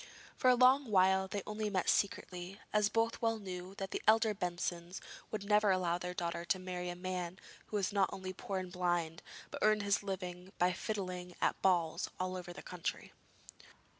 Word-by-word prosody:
For 255 - +4
a 250 - +7
long 255 +1 +5
while 190 -1 +4
they 200 0 -3
only 215 0 -2
met 190 -3 0
secretly, 185 -1 0
as 210 -1 +4
both 225 +1 +1
well 225 -1 +2
knew 185 -2 -7
that 195 -1 -5
the - - -2
elder 220 0 +5
Bensons 175 -1 -3 0.3
would 215 -2 -3
never 210 0 +4
allow 180 -2 +2
their 180 0 -4
daughter 170 -1 -2
to 195 +1 +1
marry 180 -1 -4
a 175 - -4
man 180 0 -3 0.3
who - - -5
was 200 0 0
not 195 -2 +3
only 185 -1 -5
poor 195 +1 -4
and 185 -1 -4
blind, 175 -2 0 0.3
but - - -5
earned 215 -1 +4
his 200 0 +2
living 185 -2 -5
by 180 +1 +3
fiddling 185 -3 -4
at - - +1
balls 175 -4 +2
all 185 0 -1
over 180 -1 -6
the 175 - -9
country. 180 -2 -4
185 Hz, 190 wpm, -35 LUFS, 180-205 Hz, 0.3 s, a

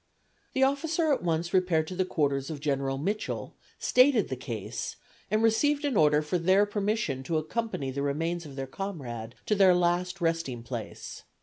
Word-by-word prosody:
The 265 - +2
officer 310 +3 +2
at - - -1
once 170 0 -1
repaired 180 -4 +3
to 185 - -5
the 185 0 +1
quarters 140 -5 0
of 155 -3 -5
General 135 -2 -1
Mitchell, 200 +9 -3 0.2
stated 255 -4 +4
the 130 - -2
case 115 -5 -5 0.3
and 215 +2 +2
received 290 +6 +3
an 280 -4 0
order 150 -3 +4
for 160 +4 -1
their 190 +4 +4
permission 205 - -1
to 160 +5 -1
accompany 155 - -2
the 140 +2 -3
remains 165 +5 -1
of 140 - -10
their 135 -1 -3
comrade 130 - -6
to - - +1
their 195 -3 +6
last 180 +1 +1
resting 165 -8 -1
place. 115 -3 -7
170 Hz, 175 wpm, -28 LUFS, 140-205 Hz, 0.3 s, their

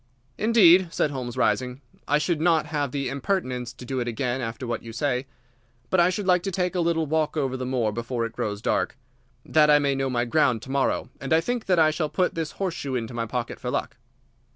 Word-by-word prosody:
"Indeed!" 190 -6 +6
said 150 - 0
Holmes, 125 -3 -5
rising. 125 +5 0 0.3
"I 145 - +3
should 155 +1 0
not 165 -2 +3
have 145 -3 -2
the 140 -1 -2
impertinence 130 -4 -2
to 125 - -11
do 130 +1 -2
it 120 - -2
again 125 +2 -2
after 115 +1 -4
what 120 -1 -3
you 115 - -9
say. 125 +2 -1 0.6
But 185 - +3
I 175 +1 +5
should 190 +2 -3
like 180 -1 +4
to 195 - -3
take 180 0 -1
a 180 - -1
little 165 -1 +1
walk 155 +1 0
over 135 -3 0
the 130 -1 -4
moor 120 -4 0
before 115 +2 -2
it 115 - -6
grows 105 -2 -3
dark, - - 0 0.5
that 150 -1 +4
I 150 - +7
may 140 -1 +1
know 135 0 -1
my 120 -1 0
ground 125 -3 +2
to 130 - -8
morrow, 135 -1 0
and 135 - -6
I 160 - +6
think 240 +6 -3
that 185 -2 +3
I 155 -1 +5
shall 155 -1 -2
put 185 +2 0
this 165 -2 -3
horseshoe 165 -8 -3
into 120 0 -3
my 115 -1 -2
pocket 120 +1 -4
for 125 - -4
luck." 125 - -3
140 Hz, 230 wpm, -25 LUFS, 125-165 Hz, 0.6 s, I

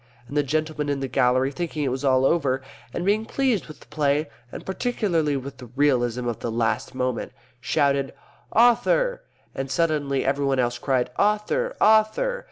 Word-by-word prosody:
And 140 - -8
the 145 - +4
gentleman 150 +1 -2
in 140 -1 -1
the 135 - -2
gallery, 130 +1 +2
thinking 155 +1 -3
it 135 - 0
was 130 +2 -3
all 130 -1 +3
over, 135 -5 +1 0.3
and 175 - -4
being 210 +2 +2
pleased 250 -3 0
with 155 -2 -12
the - - -15
play 145 0 0 0.2
and - - -8
particularly 185 - 0
with 135 0 -7
the 125 - -10
realism 125 -4 +1
of 120 - -3
the - - -3
last 115 +2 -1
moment 125 -2 -1
of - - -35
it, - - -30 0.2
shouted, 140 +1 +1 0.4
"Author." 370 - +3 0.3
And 135 0 -4
suddenly 145 -2 0
everybody 135 -1 +1
else 120 -1 0
cried, 125 -2 0
"Author! 210 - +1
Author." 220 - +3
140 Hz, 175 wpm, -24 LUFS, 130-180 Hz, 0.4 s, the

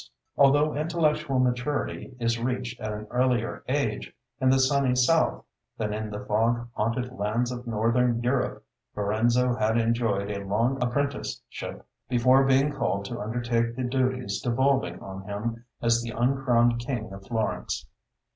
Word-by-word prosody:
Although 145 +2 +4
intellectual 155 -3 +1
maturity 125 +1 -1
is 115 -1 0
reached 125 0 -3
at 110 - -3
an 105 0 -5
earlier 125 -2 0
age 130 -5 -1 0.3
in 130 -1 +3
the 135 - +5
sunny 130 -1 +3
South 155 +6 +2 0.3
than 105 -1 -2
in 110 0 -3
the 105 0 -6
fog 115 +3 +1
haunted 120 +4 -1
lands 115 +4 0
of 125 0 -6
Northern 115 +2 +2
Europe, 125 +1 -1 0.3
Lorenzo 120 +4 +2
had 110 0 +1
enjoyed 115 -3 +1
a 100 -1 -4
long 115 +7 0
apprenticeship 140 +4 -3 0.2
before 130 +2 +5
being 135 +2 +3
called 100 -7 -1
to - - -5
undertake 115 +1 -1
the 130 - -3
duties 125 -4 -1
devolving 125 -7 +1
on 95 0 -7
him 115 +3 -4 0.2
as 115 0 +3
the 120 - -5
uncrowned 120 -2 +3
king 120 -4 -4
of 95 0 -11
Florence. 110 -2 -2
120 Hz, 145 wpm, -27 LUFS, 110-130 Hz, 0.3 s, the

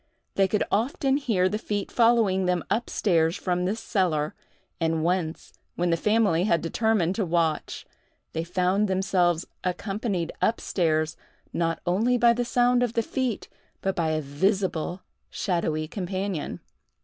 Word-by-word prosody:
They 195 -1 +3
could 210 +2 +1
often 265 +5 +1
hear 215 -10 +1
the 210 +3 -2
feet 205 -3 -3
following 225 -6 +3
them 180 -2 +1
up 230 +4 0
stairs 165 -4 +2
from 180 -1 -1
this 205 +5 -1
cellar; 165 -10 0 0.5
and 160 -1 0
once, 170 -2 -1 0.2
when 175 0 0
the - - +4
family 200 -2 +2
had 170 -5 +3
determined 190 0 +1
to 215 - +1
watch, 165 -3 -1 0.5
they 160 - -1
found 185 +4 +1
themselves 185 -3 +1 0.2
accompanied 195 -1 -2
up 225 - +2
stairs 160 -3 0 0.4
not 165 -1 -1
only 220 +8 +2
by 235 0 +5
the 245 +1 -1
sound 245 +1 +3
of 245 -2 0
the 230 - +1
feet, 250 -2 -2 0.3
but 195 0 -1
by 165 -2 0
a 155 0 0
visible 180 +3 -1 0.3
shadowy 160 -4 -1
companion! 185 -1 -4
185 Hz, 150 wpm, -26 LUFS, 170-215 Hz, 0.5 s, by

